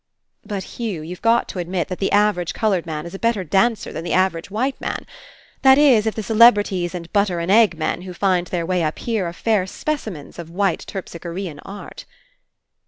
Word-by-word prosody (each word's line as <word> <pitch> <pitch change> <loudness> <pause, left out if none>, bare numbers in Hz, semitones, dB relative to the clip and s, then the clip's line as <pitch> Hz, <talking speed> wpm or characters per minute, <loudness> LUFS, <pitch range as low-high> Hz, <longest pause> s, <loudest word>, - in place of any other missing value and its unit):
"But, 200 -3 -4 0.2
Hugh, 205 -10 -3
you've 175 +3 -8
got 230 +1 +3
to 185 - -5
admit 175 0 -2
that 185 - -5
the 195 - 0
average 205 -4 +2
coloured 195 -6 0
man 155 -1 -4
is 170 - -8
a 195 - -6
better 230 -4 +1
dancer 200 +6 +1
than 160 - -5
the 175 - -2
average 185 -2 +1
white 255 +7 -2
man - - -4 0.3
— - - -28
that 265 -1 +7
Is, 255 -7 +5
If 220 - -1
the 220 - -3
celebrities 205 -5 +4
and 170 -1 -8
'butter 200 -4 +2
and 170 +3 -1
egg' 210 -5 +5
men 160 - -2
who 185 0 -8
find 180 -2 +1
their 170 -1 -2
way 180 0 0
up 155 -1 -1
here 220 -6 -1
are - - -4
fair 205 -1 +1
specimens 210 - -5
of 165 -1 -7
white 190 0 0
Terpslchorean 170 -3 -6
art." 200 +1 -9
190 Hz, 205 wpm, -21 LUFS, 175-215 Hz, 0.3 s, that